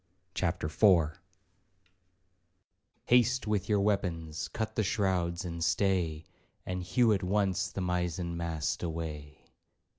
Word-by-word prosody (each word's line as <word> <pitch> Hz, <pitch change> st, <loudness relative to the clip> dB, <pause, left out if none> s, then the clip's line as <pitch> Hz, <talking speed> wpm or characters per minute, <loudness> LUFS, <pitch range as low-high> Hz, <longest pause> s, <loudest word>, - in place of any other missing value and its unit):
CHAPTER 90 Hz, -2 st, -1 dB
IV 80 Hz, -1 st, +3 dB, 1.9 s
Haste 125 Hz, +1 st, +3 dB
with 105 Hz, -2 st, -1 dB
your 105 Hz, -1 st, +3 dB
weapons, 85 Hz, -6 st, -1 dB
cut 110 Hz, -1 st, -4 dB
the -, -, 0 dB
shrouds 95 Hz, -4 st, 0 dB
and 85 Hz, -1 st, -4 dB
stay, 85 Hz, -4 st, +1 dB, 0.4 s
And 90 Hz, 0 st, -3 dB
hew 110 Hz, +5 st, +3 dB
at 100 Hz, -, 0 dB
once 95 Hz, -1 st, +1 dB
the 95 Hz, -, -4 dB
mizen 90 Hz, -1 st, -1 dB
mast 85 Hz, -3 st, -2 dB
away. 80 Hz, -3 st, -5 dB
90 Hz, 115 wpm, -30 LUFS, 85-100 Hz, 1.9 s, IV